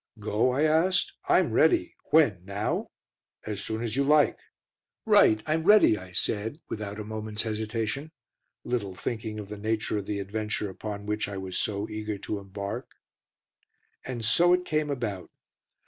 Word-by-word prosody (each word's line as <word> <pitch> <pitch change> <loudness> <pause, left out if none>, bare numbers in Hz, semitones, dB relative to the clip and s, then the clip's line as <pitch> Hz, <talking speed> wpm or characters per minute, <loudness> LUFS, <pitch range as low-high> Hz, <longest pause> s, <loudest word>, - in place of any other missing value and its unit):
"Go?" 105 +3 +1
I 130 +4 +1
asked. 160 +4 +3 0.2
"I'm - - +4
ready. 340 -1 +3
When? 115 - +3
Now?" 100 +2 -2 0.6
"As 105 -2 -3
soon 110 +1 -2
as 115 -1 -2
you 140 - +2
like." 150 +1 +4 0.7
"Right, 110 0 +5
I'm 155 +1 0
ready," 205 - +6
I 95 -2 -9
said, 105 - -1
without 105 -1 -5
a - - -3
moment's 110 0 -3
hesitation, 110 +6 -3 0.5
little 105 -6 -2
thinking 110 +2 -4
of 105 -2 -7
the 105 - -6
nature 110 0 -1
of 100 - -8
the 105 - -2
adventure 105 0 -3
upon 100 +1 -6
which 105 0 -1
I 100 -1 -5
was 95 -1 -5
so 100 -1 -1
eager 105 -1 -4
to 100 +1 -4
embark. 100 0 -6 1.1
And 120 -4 -4
so 175 +10 +5
it 180 0 +1
came 155 -2 0
about. 115 -9 -3
110 Hz, 160 wpm, -27 LUFS, 105-130 Hz, 1.1 s, ready